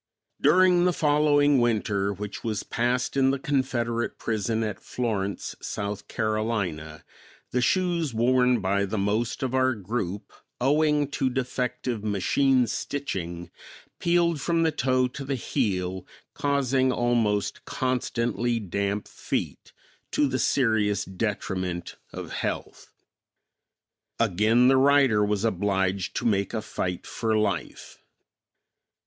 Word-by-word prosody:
During 180 +3 +5
the 180 - +3
following 145 -2 +3
winter 105 -4 +1
which 100 +1 -6
was 110 -2 -2
passed 125 +2 -1
in 135 -1 +4
the 135 - +1
Confederate 125 -4 -1
prison 110 +1 -1
at 105 -3 -3
Florence, 100 -6 -3
South 100 0 -4
Carolina, 105 -9 -2 0.5
the 125 - +1
shoes 170 -1 +1
worn 125 +1 +3
by 100 +1 +1
the 105 +3 -3
most 110 +6 -1
of 130 -1 -2
our 130 -1 +2
group, 100 -1 -4 0.3
owing 150 +2 +2
to 135 -2 0
defective 125 -3 -2
machine 125 +6 +2
stitching, 85 -10 -4 0.5
peeled 170 -3 +2
from 165 +1 +1
the 160 - +2
toe 130 -2 +1
to 140 +2 -7
the 135 0 -2
heel, 95 -8 -2 0.3
causing 135 -2 +1
almost 115 -5 0
constantly 120 -2 -1
damp 100 +1 -2
feet, - - -4 0.4
to 150 - +2
the 130 -1 -1
serious 110 -6 +2
detriment 95 -3 -3 0.2
of - - -7
health. - - -4 1.3
Again 115 +3 +3
the 135 0 +5
writer 135 -6 +4
was 105 +1 0
obliged 95 -3 0
to - - -2
make 100 -1 +1
a 110 - -2
fight 90 -4 -4
for 110 -2 -1
life. 100 -5 -3
115 Hz, 120 wpm, -26 LUFS, 100-135 Hz, 1.3 s, During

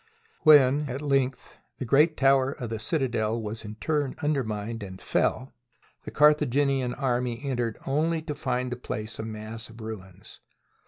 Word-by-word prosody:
When, 145 -1 +6
at 135 +4 -4
length, 135 -3 -1 0.2
the 130 - -4
great 150 +6 +4
tower 135 0 +3
of 120 -5 -6
the 110 - -3
citadel 115 -3 0
was 110 +1 -5
in 105 0 -7
turn 145 +2 -1
undermined 115 -6 -2
and 95 -2 -8
fell 130 - -1 0.5
the - - -5
Carthaginian 140 -3 +3
army 125 -3 -1
en 135 -3 -2
tered 115 -2 -1
only 160 +4 0
to 150 - -4
find 125 -2 -2
the 125 - -3
place 110 -3 -6
a - - -3
mass 110 +1 -6
of 115 +1 -14
ruins. 105 -5 -9
125 Hz, 160 wpm, -27 LUFS, 110-140 Hz, 0.5 s, When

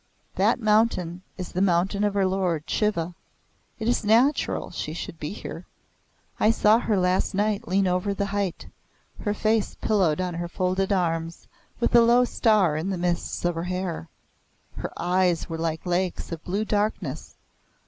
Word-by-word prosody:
That - - +2
mountain 210 -6 +1 0.2
is 180 -2 -6
the 180 - -1
mountain 190 +2 +2
of 205 -1 +1
her 195 -1 +3
lord 185 -5 0
Shiva. 180 -5 0 0.6
It 220 - -4
is 240 -1 +1
natural 235 +8 +2
she - - -4
should - - -7
be - - -4
here. - - -8 0.7
I 215 - +4
saw 220 0 +4
her 220 -4 0
last 185 +1 +1
night 205 0 0
lean 195 +2 +2
over 180 +2 0
the 200 - -1
height 200 -3 -2 0.5
her 205 0 -1
face 215 0 +1
pillowed 185 -7 +1
on 180 -1 -1
her 170 +1 -3
folded 185 +3 -1
arms, 165 -3 -1 0.3
with 235 - 0
a 240 - +8
low 240 +2 +5
star 210 -10 +3
in 160 +5 -2
the 190 - -1
mists 175 0 -2
of 175 - +2
her 165 +1 -4
hair. 180 - -3 0.7
Her - - -4
eyes 180 -1 +1
were 165 0 -4
like 160 0 -2
lakes 180 0 -1
of 165 -1 -6
blue 200 +4 -1
darkness. 210 0 -2
190 Hz, 170 wpm, -25 LUFS, 175-210 Hz, 0.7 s, a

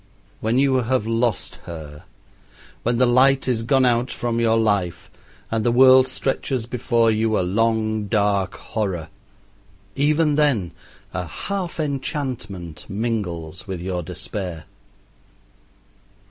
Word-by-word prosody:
When 115 +3 0
you 135 -1 +3
have 125 -2 0
lost 115 -2 -1
her 75 -3 -9 0.8
when 120 0 0
the 125 - +5
light 130 +3 +4
is 120 -3 +1
gone 130 +3 +3
out 120 +1 +2
from 120 -1 -2
your 115 -1 +3
life 100 -6 0 0.4
and 110 -1 0
the 120 - +2
world 130 +1 +7
stretches 130 -3 -2
before 120 -1 +1
you 110 0 +1
a - - +2
long, 110 +2 0
dark 100 -2 +1
horror, 95 -8 -3 0.9
even 150 +1 +2
then 130 - +2 0.4
a 90 -2 -3
half 180 - -4
enchantment 130 - -4
mingles 95 -6 -3
with 95 -2 -4
your 90 0 -3
despair. 85 0 -5
115 Hz, 120 wpm, -22 LUFS, 95-130 Hz, 0.9 s, world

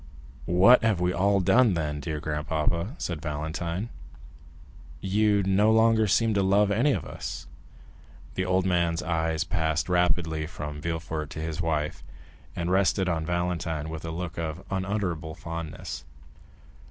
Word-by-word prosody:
"What 95 +9 +6
have 110 -5 +2
we 90 0 +1
all 100 +2 +2
done, 100 +2 +4
then, 75 -3 -2
dear 75 0 -4
grandpapa?" 80 - -1
said 85 -4 -4
Valentine; 85 +7 -3 1.1
"you 100 +2 +2
no 100 +3 +3
longer 110 -1 +4
seem 115 +3 +3
to 100 - +2
love 100 +2 +3
any 120 +9 +3
of 85 - -1
us?" - - -6 0.9
The 95 - -1
old 95 0 +1
man's 85 -2 +1
eyes 80 0 0
passed 80 -2 -1
rapidly 90 -3 +1
from 75 -2 -6
Villefort 80 -2 -4
and 80 - -3
his 80 0 -3
wife, 80 -2 -2 0.5
and 85 +1 -2
rested 95 0 +2
on 80 -2 -1
Valentine 85 -3 -2
with 80 -1 -6
a 80 - -4
look 85 +1 -5
of 80 +2 -4
unutterable 95 -5 -2
fondness. 85 -2 -6
85 Hz, 140 wpm, -27 LUFS, 80-95 Hz, 1.1 s, What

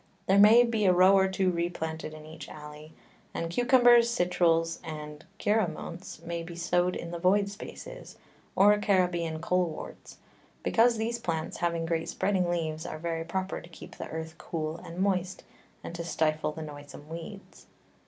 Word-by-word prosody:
There 195 +1 +4
may 220 +4 +8
be 225 -3 0
a 180 - +6
Row 185 +2 +6
or 190 0 +4
two 190 -1 +1
replanted 160 -2 -3
in 155 0 -11
each 155 -1 -10
Alley, 150 +1 -11 0.4
and 165 0 -3
Cucumbers, 245 +1 +5
Citruls, 170 -5 +1
and 150 -2 -8
[x]_Giraumonts_ 175 -4 -2
may 170 0 -3
be 170 +1 -8
sow'd 175 +1 +1
in 170 - -6
the 170 - -5
void 195 +3 +3
Spaces, 210 - -10 0.4
or 205 +2 +6
Caribean 175 -5 +1
Coleworts; 175 -1 -3 0.5
because 235 0 +3
these 230 +2 -2
Plants 160 -7 -3
having 170 -1 -1
great 165 0 -1
spreading 190 -2 0
Leaves, 160 -2 -2
are 170 - -5
very 165 0 -3
proper 190 +3 -3
to 170 - -14
keep 170 - -12
the - - -6
Earth 160 0 -5
cool 160 -1 -4
and 170 0 -10
moist, 185 -1 -1 0.4
and - - -7
to 170 0 -5
stifle 155 -2 0
the 160 +1 -7
noisome 145 -1 -10
Weeds. 170 +5 -10
170 Hz, 165 wpm, -29 LUFS, 160-195 Hz, 0.5 s, may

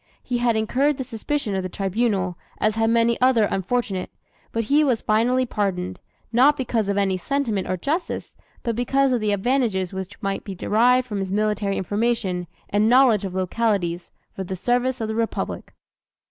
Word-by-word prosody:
He 245 -1 -2
had 240 -1 +2
incurred 260 +6 +1
the 265 - -2
suspicion 230 0 -3
of 190 - 0
the 185 - -4
Tribunal, 195 -1 -1 0.2
as 215 0 +1
had 225 +1 +1
many 230 0 +3
another 255 -3 +5
unfortunate; 195 -1 -1 0.4
but 230 - -1
he 285 +7 +3
was 255 -6 +1
finally 245 +4 +2
pardoned, 185 -5 -2 0.3
not 275 +5 +5
because 225 -5 -1
of 200 - 0
any 195 -2 +1
sentiment 225 -3 -1
or 185 - 0
justice, 310 - -3 0.3
but 235 -3 -1
because 270 +3 +2
of 240 - 0
the 210 -1 +1
"advantages 205 -3 0
which 190 +1 -6
might 195 -1 -2
be 195 - -6
derived 245 +7 +3
from 210 -4 -3
his 190 -1 -3
military 210 -1 0
information 205 -3 -1 0.2
and 210 +2 +2
knowledge 245 -5 +5
of 185 -1 -5
localities, 185 -3 -1 0.3
for 190 - -4
the 190 +1 -4
service 245 +5 0
of 220 - -1
the 220 - -2
Republic." 225 0 -3
220 Hz, 175 wpm, -23 LUFS, 195-245 Hz, 0.4 s, another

